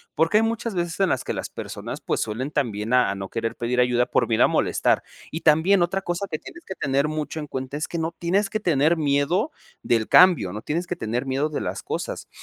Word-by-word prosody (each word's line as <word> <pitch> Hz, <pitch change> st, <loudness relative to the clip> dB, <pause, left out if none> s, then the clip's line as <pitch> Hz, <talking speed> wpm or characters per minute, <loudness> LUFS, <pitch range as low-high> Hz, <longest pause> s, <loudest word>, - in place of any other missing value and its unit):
porque 165 Hz, +6 st, +3 dB
hay 220 Hz, -, +4 dB
muchas 225 Hz, -1 st, -2 dB
veces 175 Hz, 0 st, -2 dB
en 195 Hz, -, +3 dB
las -, -, 0 dB
que -, -, -3 dB
las -, -, -4 dB
personas, -, -, -6 dB
pues, -, -, -2 dB
suelen 120 Hz, +6 st, -3 dB
también 115 Hz, -6 st, -1 dB
a 125 Hz, -5 st, +4 dB
a 100 Hz, -, -2 dB
no 95 Hz, 0 st, -6 dB
querer 115 Hz, 0 st, -3 dB
pedir 120 Hz, +1 st, -1 dB
ayuda 125 Hz, 0 st, +3 dB
por 120 Hz, -, +1 dB
miedo 110 Hz, -1 st, +3 dB
a -, -, +6 dB
molestar. -, -, +1 dB, 0.3 s
Y 160 Hz, -, -4 dB
también 165 Hz, +5 st, +4 dB
otra 175 Hz, +3 st, 0 dB
cosa 175 Hz, +3 st, -2 dB
que 155 Hz, -, -2 dB
tienes 345 Hz, -, -12 dB
que 190 Hz, -, -5 dB
tener 140 Hz, -1 st, +1 dB
mucho 155 Hz, +1 st, -3 dB
en 150 Hz, -, -6 dB
cuenta, 130 Hz, +1 st, -5 dB
es 155 Hz, -, -3 dB
que 170 Hz, -, -5 dB
no 165 Hz, +1 st, -1 dB
tienes 195 Hz, +4 st, 0 dB
que 215 Hz, -, -1 dB
tener 160 Hz, -3 st, +3 dB
miedo 150 Hz, -, +1 dB, 0.3 s
del 115 Hz, -2 st, +1 dB
cambio, 175 Hz, -, +6 dB
no 105 Hz, -, -5 dB
tienes 170 Hz, +4 st, -2 dB
que 180 Hz, -, -3 dB
tener 120 Hz, +4 st, -3 dB
miedo 135 Hz, +3 st, 0 dB
de 150 Hz, -, -3 dB
las -, -, -4 dB
cosas. -, -, -4 dB
150 Hz, 240 wpm, -24 LUFS, 125-175 Hz, 0.3 s, a